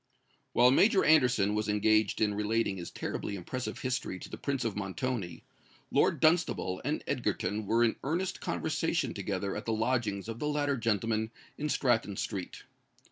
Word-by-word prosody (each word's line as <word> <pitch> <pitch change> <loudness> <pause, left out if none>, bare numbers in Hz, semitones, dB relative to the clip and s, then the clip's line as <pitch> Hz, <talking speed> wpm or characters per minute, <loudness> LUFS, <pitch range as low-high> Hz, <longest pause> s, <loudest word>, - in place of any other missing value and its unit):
While 125 +1 +6
Major 195 - +4
Anderson 125 -10 +4
was 105 0 -1
engaged 110 0 +2
in 105 -1 +3
relating 105 -1 0
his 85 - -6
terribly 100 - -4
impressive 125 +7 -5
history 130 -7 -2
to - - -9
the - - -6
Prince 135 -4 -2
of 110 - -1
Montoni, 100 -3 -3 0.5
Lord - - +3
Dunstable 155 - +2
and - - -2
Egerton 105 +3 -1
were 115 +3 +3
in 115 - +2
earnest 180 +6 -2
conversation 160 -4 -1
together 100 -1 -3
at 105 - -5
the 115 - +1
lodgings 110 -3 0
of 115 0 -5
the 150 - -1
latter 145 -1 +1
gentleman 110 -1 0 0.3
in 150 +1 -3
Stratton 115 -8 +1
Street. 95 -4 -4
115 Hz, 160 wpm, -30 LUFS, 100-130 Hz, 0.5 s, While